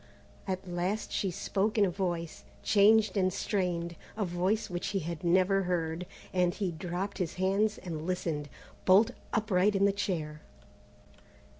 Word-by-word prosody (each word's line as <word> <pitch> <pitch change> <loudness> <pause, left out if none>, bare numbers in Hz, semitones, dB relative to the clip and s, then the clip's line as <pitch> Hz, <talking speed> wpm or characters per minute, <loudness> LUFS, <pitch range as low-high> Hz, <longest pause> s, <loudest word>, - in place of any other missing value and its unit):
At 190 0 -3
last 180 +4 -2
she 195 - 0
spoke 200 +4 -1
in 205 - +6
a 185 - 0
voice, 175 -3 -3 0.2
changed 215 0 +5
and 185 -1 +3
strained, 175 -4 -1 0.2
a 210 - 0
voice 185 +5 0
which 175 -1 -3
he 200 -1 0
had 170 +2 -5
never 185 +3 +3
heard, 170 -1 -1 0.3
and 180 -1 +2
he 195 -4 -1
dropped 180 +5 -4
his 175 -4 -2
hands 195 +3 +1
and 165 -3 -6
listened, 160 -5 -2 0.4
bolt 205 +6 +6 0.2
upright 205 -2 +2
in 195 0 +4
his 200 - +3
chair. 160 -7 -3
185 Hz, 150 wpm, -30 LUFS, 175-200 Hz, 0.4 s, in